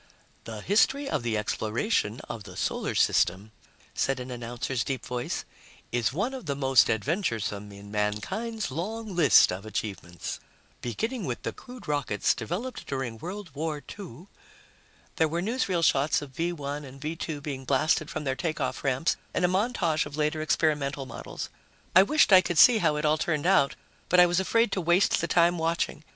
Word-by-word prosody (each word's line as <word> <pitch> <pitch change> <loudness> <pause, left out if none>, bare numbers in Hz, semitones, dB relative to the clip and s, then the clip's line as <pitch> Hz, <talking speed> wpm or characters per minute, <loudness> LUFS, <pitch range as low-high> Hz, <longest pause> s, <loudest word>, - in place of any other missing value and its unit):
"The 110 -2 -7
history 270 - +2
of - - -1
the 115 -2 -1
exploration 110 - -1
of 110 - -6
the - - -11
Solar - - -2
System," 95 +5 +2 0.4
said 135 -1 0
an 125 0 -6
announcer's 120 0 -3
deep 135 +2 -4
voice, 125 -1 -3 0.5
"is 120 -1 +1
one 200 - -1
of 255 -10 -7
the 140 - -1
most 135 -3 +4
adventuresome 110 - -1
in 100 0 -11
mankind's 110 - -2
long 210 +7 -4
list 155 -6 +6
of 90 +2 -5
achievements. 95 -5 -5 0.4
Beginning 220 - -3
with 125 -3 -4
the - - -3
crude 250 -1 -12
rockets 145 -8 +1
developed 185 - -5
during 130 -5 -4
World 185 - -7
War 155 +1 -2
II...." 180 - -9 0.9
There 160 - +4
were 165 +2 -2
newsreel 190 -4 0
shots 145 0 +3
of 140 - -10
V 165 +6 -1
1 145 -2 -5
and 135 -1 -11
V 155 +3 -4
2 160 -2 -4
being 140 -2 -5
blasted 140 +3 +1
from 155 - -4
their 135 -2 -1
takeoff 155 +3 -2
ramps 135 +4 +1 0.2
and 180 - +2
a - - +4
montage 185 -6 +1
of 145 0 -9
later 150 +1 0
experimental 150 -3 0
models. 125 - -7 0.5
I 185 - +10
wished 255 +1 +4
I 185 - +10
could 175 -2 -3
see 235 +4 +8
how 155 -5 +2
it 150 +1 -1
all 155 +1 +3
turned 155 -2 -1
out, 180 -7 +4 0.3
but 180 - +5
I 180 - +9
was 175 +1 +2
afraid 230 +3 +2
to 190 - -1
waste 175 +3 +3
the 170 - -1
time 170 0 +3
watching. 165 -2 -1
150 Hz, 180 wpm, -27 LUFS, 125-180 Hz, 0.9 s, I